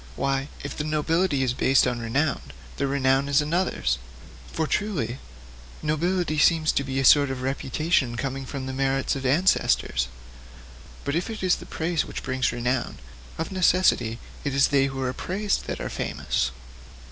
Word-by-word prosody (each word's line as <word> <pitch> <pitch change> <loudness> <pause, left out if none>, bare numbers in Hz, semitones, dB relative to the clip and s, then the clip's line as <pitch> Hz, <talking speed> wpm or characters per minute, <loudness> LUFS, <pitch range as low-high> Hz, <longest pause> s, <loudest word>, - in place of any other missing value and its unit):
Why, 135 0 -1 0.2
if 145 - -5
the 150 - -3
nobility 155 0 +1
is 125 -2 +1
based 130 +1 +3
on 125 -2 -1
renown, 135 +6 0 0.4
the 140 - 0
renown 135 0 +2
is 140 +1 +4
another's! 150 - 0 0.5
For, 160 - -1
truly, 155 - -1 0.6
nobility 155 +1 0
seems 160 -1 +4
to 140 - 0
be 135 0 -2
a 135 - +1
sort 145 +1 +7
of 130 -1 -4
reputation 135 -1 0
coming 135 +1 -3
from 135 0 -5
the 130 - -4
merits 135 0 0
of 135 -1 -2
ancestors. 135 - +2 1.0
But 140 - -1
if 175 +5 -1
it 220 -3 -6
is 185 -1 +3
the - - -11
praise 165 0 -1
which - - -7
brings 130 0 0
renown, 120 +1 -1 0.4
of 165 +2 -3
necessity 180 -11 +3 0.3
it 140 -2 -2
is 140 - +4
they 135 -1 +3
who 135 -1 -5
are 125 0 -1
praised 195 +7 -2
that - - -3
are - - -3
famous. 65 - -1
140 Hz, 170 wpm, -25 LUFS, 130-160 Hz, 1.0 s, sort